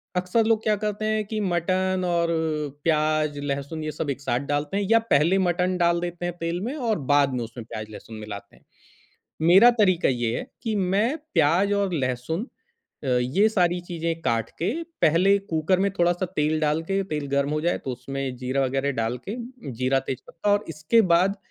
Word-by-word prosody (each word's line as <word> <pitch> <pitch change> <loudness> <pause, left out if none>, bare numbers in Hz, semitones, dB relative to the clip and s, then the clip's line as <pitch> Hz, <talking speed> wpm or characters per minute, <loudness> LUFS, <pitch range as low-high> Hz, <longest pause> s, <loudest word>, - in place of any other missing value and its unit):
अक्सर 180 +5 +1
लोग 225 -1 +2
क्या 215 -1 +2
करते 210 +1 -3
हैं 215 0 +1
कि 215 +1 -3
मटन 185 +1 0
और 170 -1 +1 0.6
प्याज़, 155 -2 +1
लहसुन, 140 +2 -4
ये 155 - -3
सब 150 0 -4
एक 140 0 -3
साथ 125 -2 0
डालते 150 +7 -1
हैं 205 - 0
या 230 - +7
पहले 155 +7 +4
ही 195 - +2
मटन 180 +1 +1
डाल 170 -1 +2
देते 175 0 -4
हैं 175 - -2
तेल 170 +1 -2
में, 250 +8 -3
और 230 - -1
बाद 140 -2 +3
में 125 -2 -1
उसमें 115 0 -9
प्याज़, 110 -1 -7
लहसुन 110 +1 -10
मिलाते 105 -2 -8
हैं। - - -24 0.9
मेरा 200 +7 +8
तरीका 185 -5 +3
ये 120 -3 0
है - - -6 0.2
कि 225 -3 -1 0.2
मैं 230 +9 +2 0.2
प्याज़ 180 +7 +3
और 200 -2 0
लहसुन 135 - -2 0.6
अ, - - -2
ये 130 - +3
सारी 180 -4 +1
चीज़ें 165 -1 -3
काट 115 -1 0
के, 170 - -1 0.4
पहले 170 +5 +4 0.2
कुकर 160 +4 +2
में 200 - +2
थोड़ा-सा 175 +2 +2
तेल 155 +1 +1
डाल 155 +1 +1
के, 195 0 +1
तेल 150 -2 -2
गर्म 140 +1 +1
हो 155 0 0
जाए, 175 +2 0
तो 130 - -5
उसमें 130 +1 -5
जीरा 130 +2 0
वगैरह 135 +2 0
डाल 115 +2 0
के, 210 - -2 0.4
जीरा, 130 +1 +2
तेज 130 - -3
पत्ता, 205 +5 -2
और 205 +1 +1
इसके 155 +9 +2
बाद 190 +4 +3
165 Hz, 200 wpm, -25 LUFS, 140-190 Hz, 0.9 s, मेरा